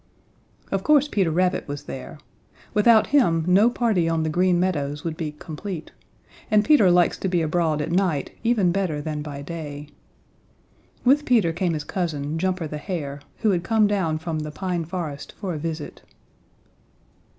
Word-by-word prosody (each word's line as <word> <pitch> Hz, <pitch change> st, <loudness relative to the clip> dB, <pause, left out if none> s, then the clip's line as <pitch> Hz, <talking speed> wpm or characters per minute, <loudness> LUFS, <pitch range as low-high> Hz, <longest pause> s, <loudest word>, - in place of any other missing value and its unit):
Of 195 Hz, -, 0 dB
course 295 Hz, +1 st, +4 dB
Peter 195 Hz, -, +1 dB
Rabbit 180 Hz, +3 st, 0 dB
was 145 Hz, 0 st, -5 dB
there. 135 Hz, +3 st, -8 dB, 0.6 s
Without 220 Hz, 0 st, +5 dB
him 165 Hz, -, +3 dB
no 200 Hz, +6 st, +5 dB
party 215 Hz, -9 st, +1 dB
on 165 Hz, -1 st, 0 dB
the 155 Hz, -, -1 dB
Green 180 Hz, +1 st, +2 dB
Meadows 150 Hz, -5 st, -1 dB
would 165 Hz, -2 st, -3 dB
be 155 Hz, -3 st, -4 dB
complete, 160 Hz, +2 st, -7 dB, 0.6 s
and 215 Hz, -2 st, +4 dB
Peter 290 Hz, -12 st, +6 dB
likes 175 Hz, -1 st, +3 dB
to -, -, -1 dB
be 175 Hz, -3 st, +1 dB
abroad 155 Hz, -2 st, 0 dB
at 150 Hz, -, -4 dB
night 175 Hz, -6 st, 0 dB
even 225 Hz, -7 st, +3 dB
better 180 Hz, -5 st, -1 dB
than 150 Hz, 0 st, -4 dB
by 145 Hz, -2 st, -7 dB
day. 150 Hz, -2 st, -7 dB, 1.2 s
With 280 Hz, +4 st, +5 dB
Peter 220 Hz, -, +3 dB
came 175 Hz, -1 st, 0 dB
his 150 Hz, -, -3 dB
cousin, 160 Hz, -4 st, -3 dB
Jumper 185 Hz, -1 st, -1 dB
the 150 Hz, 0 st, -5 dB
Hare, 150 Hz, -5 st, -4 dB, 0.2 s
who 220 Hz, -2 st, +3 dB
had 175 Hz, -2 st, 0 dB
come 220 Hz, 0 st, +3 dB
down 190 Hz, -6 st, 0 dB
from 160 Hz, -1 st, -3 dB
the 155 Hz, 0 st, -4 dB
Pine 175 Hz, +1 st, -3 dB
Forest 160 Hz, -5 st, -6 dB
for 185 Hz, -3 st, -3 dB
a 155 Hz, -, -4 dB
visit. 160 Hz, -1 st, -5 dB
170 Hz, 170 wpm, -24 LUFS, 155-195 Hz, 1.2 s, Peter